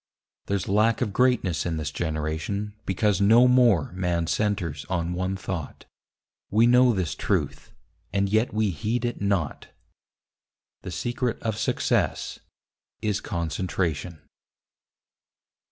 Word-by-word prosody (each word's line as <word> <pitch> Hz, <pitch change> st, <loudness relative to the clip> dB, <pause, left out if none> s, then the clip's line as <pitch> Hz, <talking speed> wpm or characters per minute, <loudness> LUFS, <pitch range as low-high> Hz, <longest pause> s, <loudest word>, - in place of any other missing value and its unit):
There's 100 Hz, -2 st, -1 dB
lack 110 Hz, +4 st, +2 dB
of 105 Hz, -5 st, -1 dB
greatness 125 Hz, -8 st, +2 dB
in 85 Hz, -2 st, -2 dB
this 75 Hz, -2 st, -3 dB
generation 80 Hz, +7 st, -3 dB
Because 100 Hz, +1 st, +1 dB
no 115 Hz, +5 st, +6 dB
more 120 Hz, -, +4 dB
man 90 Hz, -2 st, -1 dB
centres 90 Hz, -6 st, -1 dB
on 90 Hz, -2 st, -1 dB
one 95 Hz, +2 st, -2 dB
thought. 90 Hz, -5 st, -6 dB, 0.6 s
We 110 Hz, +3 st, +4 dB
know 125 Hz, +1 st, +6 dB
this 95 Hz, -7 st, -1 dB
truth, -, -, -2 dB, 0.4 s
and 100 Hz, 0 st, +1 dB
yet 110 Hz, +4 st, +1 dB
we 105 Hz, -2 st, +1 dB
heed 110 Hz, +10 st, -2 dB
it 120 Hz, -3 st, -3 dB
not: 100 Hz, -7 st, -1 dB, 1.1 s
The -, -, -7 dB
secret 120 Hz, 0 st, -2 dB
of 110 Hz, -2 st, -1 dB
success 110 Hz, -, 0 dB, 0.6 s
is 105 Hz, -2 st, 0 dB
Concentration. 85 Hz, -2 st, -2 dB
100 Hz, 120 wpm, -25 LUFS, 85-110 Hz, 1.1 s, no